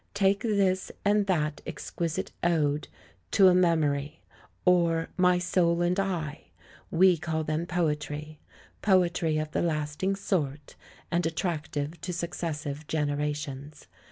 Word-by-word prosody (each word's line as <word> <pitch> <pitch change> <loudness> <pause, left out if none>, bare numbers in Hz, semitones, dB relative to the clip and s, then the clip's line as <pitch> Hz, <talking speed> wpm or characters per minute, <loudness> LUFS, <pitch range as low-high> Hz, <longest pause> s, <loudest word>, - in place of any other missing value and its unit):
Take 200 0 +3
this 195 -4 +1
and 205 0 +3
that 155 -5 0
exquisite 165 -2 -3
ode, 155 -4 +1 0.5
To 190 -2 +7
a - - +5
Memory, 155 -4 +1 0.5
or 170 -2 +3
My 180 -1 +4
Soul 175 -1 +2
and 180 +2 +1
I! 165 -6 -2 0.4
We 180 +1 +5
call 160 -1 -2
them 155 +2 -2
poetry; 150 -3 -2 0.4
poetry 175 -5 +2
of 155 0 -2
the - - 0
lasting 155 +3 -1
sort, 150 -8 -2 0.4
and 175 0 +1
attractive 160 -1 -3
to 180 0 -4
successive 155 -3 -4
generations. 150 -1 -3
165 Hz, 120 wpm, -28 LUFS, 150-180 Hz, 0.5 s, To